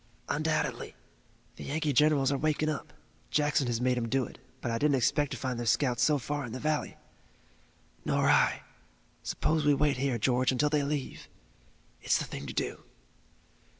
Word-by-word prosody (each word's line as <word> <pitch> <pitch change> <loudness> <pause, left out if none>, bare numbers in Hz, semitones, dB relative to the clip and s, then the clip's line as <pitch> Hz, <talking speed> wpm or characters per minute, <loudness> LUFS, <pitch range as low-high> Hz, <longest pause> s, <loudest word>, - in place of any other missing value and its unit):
"Undoubtedly. 155 +1 -1 0.6
The - - -8
Yankee 150 0 -1
generals 145 0 +4
are 140 - +1
waking 155 +1 +1
up 155 - -4 0.4
Jackson 150 -3 +1
has 120 -1 -1
made 125 0 +1
'em 115 -1 -3
do 135 +1 +1
it, - - -13 0.2
but 120 - -3
I 115 - -1
didn't 145 -1 +3
expect 140 +3 +1
to 130 - -4
find 125 0 -3
their 120 - -3
scouts 125 0 +2
so 150 -1 +4
far 145 +2 -3
in 120 -3 -6
the 130 - -4
valley." 155 +1 -1 1.1
"Nor - - +1
I. - - +3 0.6
Suppose 155 0 0
we 145 -1 +4
wait 145 -1 +1
here, 130 -2 0
George, 125 +3 +2
until 145 +3 +1
they 150 -1 +2
leave." 140 -1 -4 0.7
"It's - - +2
the - - -3
thing 70 +1 -7
to - - -5
do." - - -3
140 Hz, 180 wpm, -30 LUFS, 125-150 Hz, 1.1 s, generals